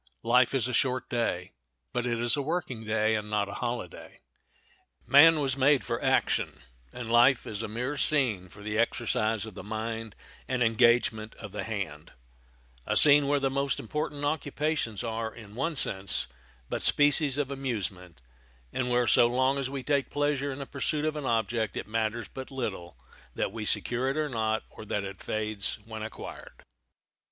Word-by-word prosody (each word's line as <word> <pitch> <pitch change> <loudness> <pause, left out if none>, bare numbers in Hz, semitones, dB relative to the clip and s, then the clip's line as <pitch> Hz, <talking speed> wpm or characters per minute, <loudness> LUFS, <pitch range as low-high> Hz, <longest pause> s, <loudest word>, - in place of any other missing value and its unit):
Life 125 +3 +4
is 125 -2 +2
a 125 - -4
short 130 +1 +1
day; 115 -7 -1 0.4
but 125 0 -1
it 120 -1 0
is 120 -1 +2
a 145 - -1
working 140 -6 -3
day, 110 0 +2
and 105 -1 -2
not 105 -1 0
a 100 - -7
holiday. 120 -8 -5 0.9
Man 155 +3 +7
was 135 -3 +1
made 140 0 +4
for 115 - -3
action, - - +1 0.3
and 120 -2 -6
life 120 +2 +5
is 105 0 -4
a 110 - -3
mere 125 +7 -3
scene 120 -13 +2
for 100 +3 -13
the 105 +1 -2
exercise 115 -2 0
of 110 - -9
the - - -8
mind 110 +1 -4 0.3
and 130 -1 +1
engagement 115 -1 +3
of - - -9
the - - -4
hand—a - - -6
scene 145 -1 +7
where 145 0 +2
the 135 -1 0
most 140 0 0
important 145 +3 -3
occupations 145 -6 -1
are, 115 -1 -3
in 105 -3 -12
one 150 +8 -2
sense, 95 -7 0 0.4
but - - -3
species 145 -1 +4
of 140 -2 -1
amusement, 100 - -4 0.5
and 125 -1 -1
where 125 0 +3
so 120 +1 +5
long 130 +3 +2
as 135 -1 -2
we 135 -1 -5
take 140 -1 +1
pleasure 145 -1 0
in 135 - -6
the 140 - -5
pursuit 145 +3 -2
of 155 0 -1
an 150 -2 -4
object 115 -1 0
it - - -3
matters 110 0 -1
but 130 -1 -8
little 95 - -5 0.4
that - - -1
we 110 0 -5
secure 125 +4 0
it 150 +2 -1
not, 110 -1 0
or - - -10
that 105 -1 -2
it 95 -1 -7
fades 110 -2 -2
when 110 -1 -7
acquired. 110 +1 -9
120 Hz, 175 wpm, -28 LUFS, 110-135 Hz, 0.9 s, Man